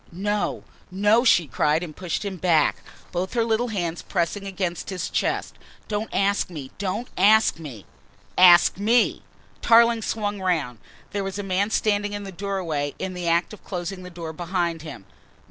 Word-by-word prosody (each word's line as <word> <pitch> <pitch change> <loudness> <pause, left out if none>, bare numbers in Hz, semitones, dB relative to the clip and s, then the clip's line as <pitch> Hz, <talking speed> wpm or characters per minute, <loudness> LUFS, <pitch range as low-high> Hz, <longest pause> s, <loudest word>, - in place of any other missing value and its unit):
"No, 205 +4 -2 0.3
no!" 205 +5 +3
she 175 -9 +5
cried 150 +5 +1
and 155 -4 -8
pushed 185 +3 -3
him 195 -2 -4
back, 170 -3 +2 0.3
both 180 +2 -3
her 235 -2 +2
little 225 +2 0
hands 175 -6 -3
pressing 195 +2 -2
against 185 -3 -3
his 185 -3 -4
chest. - - -2 0.3
"Don't 210 +1 -3
ask 200 0 +1
me, 145 -6 -8
don't 205 +5 -2
ask 215 -2 +5
me 130 -11 -9 0.3
" - - -31 0.2
"Ask 180 0 +7
me!" 230 +4 +2 0.4
Tarling 235 0 +5
swung 205 -2 -2
round. 155 -11 -1 0.3
There 200 0 -2
was 195 0 -4
a 205 - -3
man 195 +2 0
standing 205 -2 0
in 205 0 -4
the 195 - -7
doorway, 175 -7 -3
in 190 -1 -4
the 180 -1 -4
act 170 +4 +1
of 210 - -13
closing 180 0 -5
the 180 - -9
door 170 -2 -7
behind 170 -1 -2
him. 140 -11 -9
185 Hz, 175 wpm, -24 LUFS, 170-205 Hz, 0.4 s, Ask